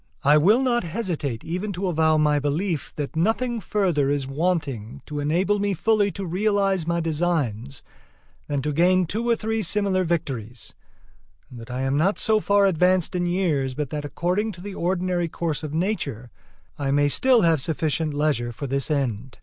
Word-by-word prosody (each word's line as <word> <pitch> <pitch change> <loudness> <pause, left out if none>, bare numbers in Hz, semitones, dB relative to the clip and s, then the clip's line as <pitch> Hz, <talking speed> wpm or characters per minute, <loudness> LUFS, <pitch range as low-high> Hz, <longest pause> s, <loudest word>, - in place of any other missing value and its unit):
I 145 +1 +5
will 205 - +4
not 240 -2 +1
hesitate 165 - -3
even 185 +5 -3
to 185 +2 -3
avow 160 -3 +2
my 150 -1 +3
belief 150 +3 -2
that 145 +1 -5
nothing 225 +7 0
further 175 -9 +1
is 145 -1 0
wanting 140 - -2
to 150 -1 -5
enable 180 +8 +1
me 200 -1 0
fully 215 +2 +2
to 200 - -5
realize 195 -1 0
my 170 0 +1
designs 150 -7 -2 0.6
than 145 -2 -2
to 150 0 -1
gain 180 +4 +3
two 225 +8 -2
or 235 - +4
three 225 0 -2
similar 200 -3 +1
victories; 125 - -4 0.8
and 125 - -10
that 115 - -11
I 125 +1 -3
am 135 +1 0
not 185 +7 +2
so 220 -1 +2
far 200 -1 +3
advanced 180 -1 +2
in 175 -1 0
years 155 -8 0
but 145 -2 -3
that, 150 -1 -3
according 180 +8 -1
to 175 - -12
the 200 +1 -7
ordinary 180 -1 -1
course 165 -2 -3
of 155 -2 -5
nature, 150 - -2 0.5
I 140 -1 -1
may 145 +1 +3
still 250 - +4
have 165 -5 +3
sufficient 155 +1 -1
leisure 145 -5 0
for 130 +5 -6
this 140 +2 -1
end. 130 -4 -2
165 Hz, 180 wpm, -24 LUFS, 145-195 Hz, 0.8 s, I